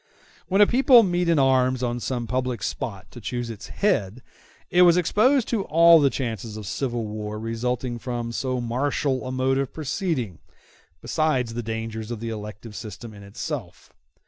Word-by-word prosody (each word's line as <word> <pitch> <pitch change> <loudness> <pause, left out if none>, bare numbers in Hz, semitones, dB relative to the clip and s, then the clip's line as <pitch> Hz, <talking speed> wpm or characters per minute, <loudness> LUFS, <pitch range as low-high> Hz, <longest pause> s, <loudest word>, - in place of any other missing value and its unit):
When 195 +2 +3
a - - +9
people 245 +1 +6
met 175 -2 0
in 165 - +3
arms 130 -2 +3
on 120 0 -1
some 120 -1 -3
public 125 -3 -2
spot 100 -6 -5
to 120 - -11
choose 120 +3 -3
its 110 - -9
head, 125 - -1 0.5
it 180 - +5
was 175 -1 +7
exposed 230 - +3
to 220 -5 0
all 165 +1 +7
the 140 -2 +4
chances 115 -5 -4
of 105 - -7
civil 120 0 -2
war 105 0 -5
resulting 120 +2 -3
from 120 -1 -4
so 130 +1 -2
martial 130 +2 -1
a - - -4
mode 130 +1 +1
of 135 -2 -2
proceeding, 145 - -3 0.6
besides 135 -7 0
the 120 - -3
dangers 110 -1 -5
of 120 -2 -4
the 115 +1 -4
elective 105 0 -7
system 110 +3 -8
in 100 - -12
itself. 100 0 -7
125 Hz, 170 wpm, -24 LUFS, 115-150 Hz, 0.6 s, a